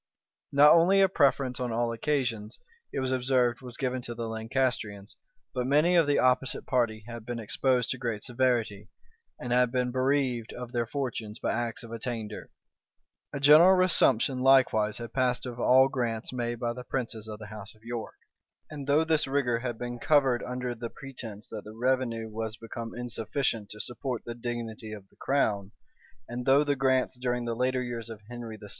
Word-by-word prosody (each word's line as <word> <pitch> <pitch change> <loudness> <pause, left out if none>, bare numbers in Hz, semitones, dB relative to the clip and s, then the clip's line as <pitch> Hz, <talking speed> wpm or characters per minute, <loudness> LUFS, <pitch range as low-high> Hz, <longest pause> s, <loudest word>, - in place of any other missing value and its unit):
Not 145 +2 +7
only 175 +4 +6
a 195 - +6
preference 140 -7 +2
on 125 -2 -2
all 115 +1 0
occasions, 115 -4 -2 0.3
it 135 - -2
was 130 0 -1
observed, 125 -1 +1
was 125 -2 -9
given 130 -1 -2
to 120 -1 -6
the 115 -1 -4
Lancastrians, 110 -3 -2 0.4
but 125 -1 -1
many 150 +6 +4
of 165 -4 +5
the 145 - +3
opposite 130 0 +1
party 115 -4 0
had 120 -1 -8
been 120 +1 -5
exposed 125 +3 +1
to 130 - -3
great 115 -5 -3
severity, 120 -5 0 0.5
and 120 0 -2
had 125 -1 +3
been 125 -1 0
bereaved 130 -3 0
of 125 -1 -7
their 120 -2 -1
fortunes 115 -5 -4
by - - -1
acts 120 0 -3
of 115 - -10
attainder. 115 -2 -5 0.8
A 140 - -4
general 155 +7 +8
resumption 145 -8 +4
likewise 125 -5 +4
had 115 -1 -7
passed 125 -1 +1
of 125 -1 -6
all 130 +2 +6
grants 120 -3 -3
made 120 -1 -2
by 120 0 -1
the 125 - -8
princes 115 -4 -4
of 105 -1 -6
the 105 - -9
house 105 0 -9
of 110 - -25
York; 115 -1 -5 0.6
and 145 -3 -7
though 145 +3 +4
this 160 -2 +1
rigor 130 -4 +1
had 120 -2 -4
been 120 0 -5
covered 135 -3 +3
under 125 0 -3
the 115 0 -6
pretence 115 -6 -9
that 105 -2 -7
the 105 +1 -11
revenue 120 -2 0
was 110 0 -5
become 115 0 -7
insufficient 120 -2 -2
to 105 - -9
support 120 +1 -4
the 120 - -5
dignity 115 -2 -5
of 100 -2 -10
the - - -29
crown, 105 -7 0 0.5
and 120 +2 -5
though 140 +2 +6
the 145 -1 +1
grants 130 -1 +1
during 125 -1 -1
the 115 - -1
later 130 +1 0
years 120 -2 -5
of 110 -2 -8
Henry 120 -2 -7
VI. 105 - -12
120 Hz, 190 wpm, -28 LUFS, 115-130 Hz, 0.8 s, general